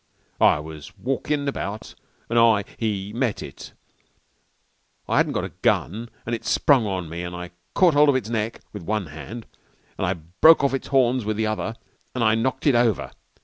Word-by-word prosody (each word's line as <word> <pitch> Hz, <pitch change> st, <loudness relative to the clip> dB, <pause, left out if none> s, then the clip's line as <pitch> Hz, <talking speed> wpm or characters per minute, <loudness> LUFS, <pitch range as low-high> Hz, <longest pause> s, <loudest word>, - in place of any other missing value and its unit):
"It 75 Hz, -, +4 dB
was 75 Hz, -3 st, -10 dB
walkin' 140 Hz, +2 st, -1 dB
about 110 Hz, -6 st, -4 dB, 0.3 s
an' 115 Hz, -, -3 dB
I 115 Hz, -3 st, +5 dB
he 105 Hz, -3 st, -2 dB
met 120 Hz, -3 st, -1 dB
it. -, -, -10 dB, 1.3 s
I -, -, +1 dB
hadn't -, -, +2 dB
got -, -, 0 dB
no -, -, -5 dB
gun, 115 Hz, +7 st, 0 dB, 0.2 s
and 120 Hz, -, -3 dB
it 115 Hz, -, -3 dB
sprung 130 Hz, -7 st, +3 dB
at 95 Hz, -4 st, -3 dB
me 85 Hz, +2 st, -5 dB
an' 90 Hz, 0 st, -5 dB
I 90 Hz, 0 st, -7 dB, 0.2 s
caught 180 Hz, -4 st, +5 dB
hold 145 Hz, 0 st, +5 dB
of 140 Hz, -, +4 dB
its 130 Hz, -5 st, -1 dB
neck 110 Hz, 0 st, -2 dB
with -, -, -6 dB
one 105 Hz, +3 st, -2 dB
hand 110 Hz, +9 st, -8 dB, 0.5 s
an' -, -, +1 dB
I 90 Hz, -, +1 dB
broke 90 Hz, -, +5 dB
off 140 Hz, -1 st, +2 dB
its 135 Hz, -, -3 dB
horns 130 Hz, -2 st, +2 dB
with 105 Hz, 0 st, -2 dB
the 110 Hz, -, +1 dB
other, 110 Hz, +1 st, -2 dB, 0.4 s
an' 125 Hz, -, 0 dB
I 110 Hz, -1 st, +4 dB
knocked 120 Hz, +4 st, -1 dB
it 145 Hz, -, +5 dB
over. 120 Hz, -4 st, +2 dB
110 Hz, 190 wpm, -24 LUFS, 95-130 Hz, 1.3 s, I